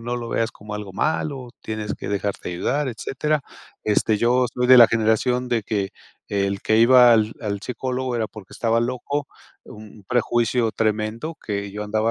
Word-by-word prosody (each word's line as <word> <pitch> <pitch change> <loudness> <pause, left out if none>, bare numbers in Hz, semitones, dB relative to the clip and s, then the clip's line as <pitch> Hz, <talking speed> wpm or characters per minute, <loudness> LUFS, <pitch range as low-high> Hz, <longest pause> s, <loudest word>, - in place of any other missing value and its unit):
no 120 +1 -3
lo 120 -1 -5
veas 115 0 0
como 105 0 -9
algo 105 -2 -6
malo, 140 -1 -2
tienes 110 -1 -4
que - - -9
dejarte 100 -2 -3
ayudar", 135 +11 -1
etcétera. 140 +5 -2 0.4
Este, 105 0 +2
yo 125 +2 +3
soy 125 0 0
de 130 - +9
la 120 - +10
generación 115 +3 +1
de 115 -3 0
que 100 -2 -2 0.4
el 100 -1 -1
que 110 - +2
iba 125 +1 +7
al 110 -1 +3
al 100 -3 -3
psicólogo 125 +1 -3
era 110 -2 0
porque 105 -4 -13
estaba 115 0 +1
loco, 130 +4 -2 0.4
un 105 -1 -13
prejuicio 120 -1 +1
tremendo 110 +8 -1
que 100 -1 -3
yo 105 0 -5
andaba 110 +2 0
115 Hz, 175 wpm, -22 LUFS, 105-125 Hz, 0.4 s, la